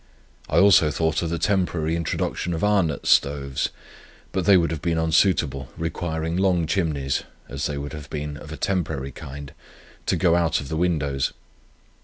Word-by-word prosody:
I - - +1
also 95 -6 +6
thought 80 +1 0
of 85 - -2
the 85 - -1
temporary 85 -3 0
introduction 85 +1 -2
of 80 - -4
Arnott's 100 -7 +2
stoves; 70 -2 +2 0.6
but 95 -2 -1
they 100 -2 +7
would 85 -2 +1
have 80 -3 -4
been 85 0 0
unsuitable, 80 -5 +2
requiring 80 0 -2
long 90 -3 +2
chimneys 75 -6 0 0.3
(as 70 +2 -3
they 75 - -4
would 70 +2 -5
have 75 -3 -8
been 75 -1 -4
of 75 +1 -10
a 80 - -6
temporary 75 -8 -2
kind) 70 +2 -9 0.5
to - - +2
go 85 -3 +3
out 85 -1 +2
of 70 - -7
the 80 - -2
windows. 75 -6 0
80 Hz, 170 wpm, -24 LUFS, 70-85 Hz, 0.6 s, they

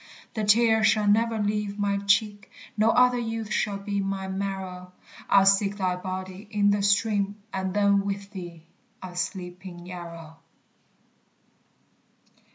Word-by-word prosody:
The 220 - -2
tear 220 +1 +4
shall 215 -1 +3
never 225 +2 +3
leave 210 -1 -1
my 200 -1 0
cheek, 205 +1 +1 0.3
No 215 +1 +3
other 250 +1 +4
youth 225 -2 -4
shall 205 -2 0
be 200 0 -3
my 195 0 -3
marrow; 190 -2 -5 0.4
I'll 195 -1 +6
seek 195 +1 +3
thy 185 -2 0
body 185 +2 -6
in 205 -1 +2
the 205 0 +1
stream, 200 0 +1 0.2
And 190 0 -2
then 200 -1 +3
with 200 0 -4
thee 175 -4 -9 0.4
I'll 185 -1 -7
sleep 180 0 -4
in 175 -2 -9
Yarrow. 170 -3 -9
200 Hz, 140 wpm, -26 LUFS, 185-210 Hz, 0.4 s, I'll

